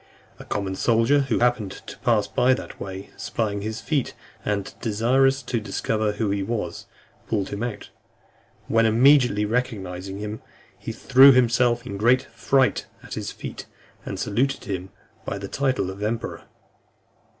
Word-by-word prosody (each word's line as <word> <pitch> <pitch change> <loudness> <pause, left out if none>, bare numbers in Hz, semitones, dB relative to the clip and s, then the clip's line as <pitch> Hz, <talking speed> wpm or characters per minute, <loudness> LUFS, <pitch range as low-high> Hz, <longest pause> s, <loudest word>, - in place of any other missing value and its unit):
A - - -10
common 100 -2 -2
soldier, 115 +7 +3
who 115 - +2
happened 120 -5 +1
to - - -8
pass 115 -5 +2
that 130 +1 0
way, 95 0 -7
spying 105 -3 -2
his 110 +1 -4
feet, 145 -7 -1 0.3
and 100 -2 -2
desirous 130 +5 +2
to 120 - -1
discover 110 0 -1
who 105 -1 -1
he 100 0 0
was, 95 -5 -4 0.4
pulled 100 -4 -1
him 100 +1 -5
out; 120 -3 -5 0.8
when 115 0 +3
immediately 125 -2 +5
recognizing 100 -5 -3
him, 105 +1 -5 0.4
he - - -5
threw 135 +2 +7
himself 120 -1 +3
in - - -6
a - - -4
great 125 +4 +4
fright 135 -2 +2 0.2
at - - -9
his - - -4
feet, - - -8 0.4
and - - -5
saluted 125 +7 0
him 95 -2 -4 0.3
by 100 - -4
the 100 0 -6
title 130 -6 0
of 100 +2 -10
emperor. 115 +2 -3
110 Hz, 150 wpm, -24 LUFS, 100-125 Hz, 0.8 s, threw